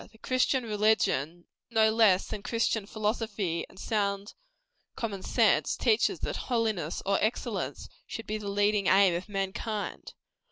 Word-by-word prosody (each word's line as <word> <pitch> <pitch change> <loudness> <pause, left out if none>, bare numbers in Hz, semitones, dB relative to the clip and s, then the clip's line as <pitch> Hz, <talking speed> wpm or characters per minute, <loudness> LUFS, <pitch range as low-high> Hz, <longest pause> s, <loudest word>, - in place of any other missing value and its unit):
The 220 - -19
Christian 255 +2 +1
religion, 205 - +1 0.2
no 220 -2 +4
less 215 -4 +4
than 205 - -6
Christian 220 -1 -1
philosophy 210 -5 -2
and 190 - -16
sound 200 -1 -1 0.6
common 205 -5 -4
sense, - - +2
teaches 435 - +2
that - - -2
holiness 220 -10 -1
or 200 0 +2
excellence 220 +3 -2 0.2
should 225 - -6
be 215 0 -3
the 205 -1 -5
leading 205 0 +2
aim 195 -1 +5
of 175 +4 -4
mankind. 200 +2 -4
210 Hz, 135 wpm, -29 LUFS, 195-220 Hz, 0.6 s, aim